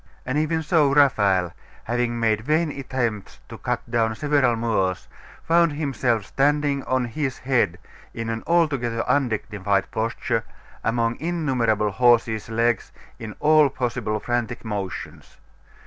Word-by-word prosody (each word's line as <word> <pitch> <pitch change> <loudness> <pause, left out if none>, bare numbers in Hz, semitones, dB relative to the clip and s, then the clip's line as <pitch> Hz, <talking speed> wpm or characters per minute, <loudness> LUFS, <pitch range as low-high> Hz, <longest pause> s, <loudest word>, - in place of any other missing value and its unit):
And 130 - -2
even 160 +1 0
so 155 -3 +3
Raphael, 100 - +3 0.3
having 120 0 -1
made 110 -2 +1
vain 155 +5 +1
attempts 125 -7 -3
to - - -9
cut - - -2
down 115 -2 0
several 140 -3 +2
Moors, 95 -5 -1 0.4
found 170 -1 +3
himself 125 -7 -1
standing 145 +1 +1
on 130 -1 0
his 135 +2 -3
head 125 -10 +1 0.3
in 115 0 -5
an 115 0 -3
altogether 140 -9 +1
undignified 105 -7 0
posture, 115 +1 -1 0.4
among 115 0 0
innumerable 130 -11 0
horses' 115 -1 +2
legs, 115 +1 0 0.3
in 110 -2 -7
all 155 -1 +5
possible 120 -4 -2
frantic 120 +1 -3
motions. 100 -4 -6
120 Hz, 125 wpm, -23 LUFS, 110-145 Hz, 0.4 s, all